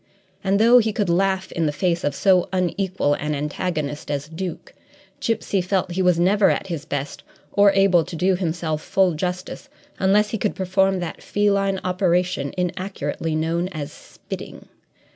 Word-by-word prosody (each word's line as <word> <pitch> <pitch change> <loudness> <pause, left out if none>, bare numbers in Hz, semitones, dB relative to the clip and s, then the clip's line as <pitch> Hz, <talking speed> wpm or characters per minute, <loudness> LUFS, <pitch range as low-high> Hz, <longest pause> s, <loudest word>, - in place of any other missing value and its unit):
And 195 +1 +2
though 235 +3 +7
he 220 -2 +1
could 205 -5 0
laugh 190 +1 +1
in 165 -2 0
the - - +1
face 170 +3 0
of 145 -1 -1
so 185 +2 +3
unequal 185 -3 0
an 150 +1 -2
antagonist 150 0 -3
as 145 0 -2
Duke, 175 +2 -6 0.5
Gipsy 220 -4 0
felt 185 0 0
that - - -5
he 190 - 0
was 180 -2 +3
never 195 +3 +4
at - - 0
his 170 -6 -5
best 145 0 -4 0.3
or 200 0 +6
able 195 -3 +4
to 170 - -7
do 185 +3 +2
himself 165 -3 -2
full 190 0 +2
justice 180 - -4 0.3
unless 210 +2 +3
he 220 - -2
could 210 - -1
perform 190 0 +1
that 175 - -5
feline 200 -2 +1
operation 180 -5 0
inaccurately 180 -4 -3
known 165 +3 0
as 155 -6 -6
"spitting." - - -10
180 Hz, 165 wpm, -22 LUFS, 165-195 Hz, 0.5 s, though